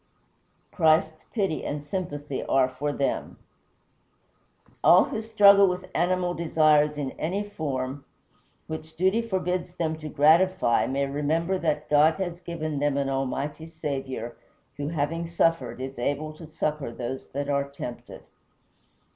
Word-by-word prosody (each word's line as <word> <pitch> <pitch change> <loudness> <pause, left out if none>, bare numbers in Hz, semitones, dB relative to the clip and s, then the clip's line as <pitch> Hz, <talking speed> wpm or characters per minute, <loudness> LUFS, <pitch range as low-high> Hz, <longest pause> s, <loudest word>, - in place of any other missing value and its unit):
Christ's 155 0 +2
pity 195 -8 -1
and 145 0 -4
sympathy 145 -5 -4
are 135 -1 +3
for 135 +3 -3
them. 140 -1 -2 1.5
All - - +8
who 220 - -4
struggle 205 -3 +6
with 180 0 -3
animal 180 +1 +1
desires 155 -3 +3
in 140 -3 -3
any 190 +6 -1
form, 140 -7 -4 0.6
which 160 0 -7
duty 190 +6 +2
forbids 180 -4 -2
them 160 -2 -1
to 155 -1 -6
gratify, 160 -1 +4
may 140 +1 0
remember 160 +6 0
that 150 -2 -1
God 150 +2 +5
has 175 -3 -4
given 155 -4 -4
them 145 -1 +1
an 140 -1 0
Almighty 135 +3 -3
Saviour, 135 -7 -5 0.4
who, 145 0 -4
having 165 +2 -2
suffered, 165 -8 0
is 130 -1 -6
able 145 +5 -2
to 155 +1 -11
succor 155 -4 -2
those 125 +2 -5
that 140 +1 -2
are 140 -1 0
tempted. 125 -3 -8
155 Hz, 135 wpm, -26 LUFS, 140-170 Hz, 1.5 s, All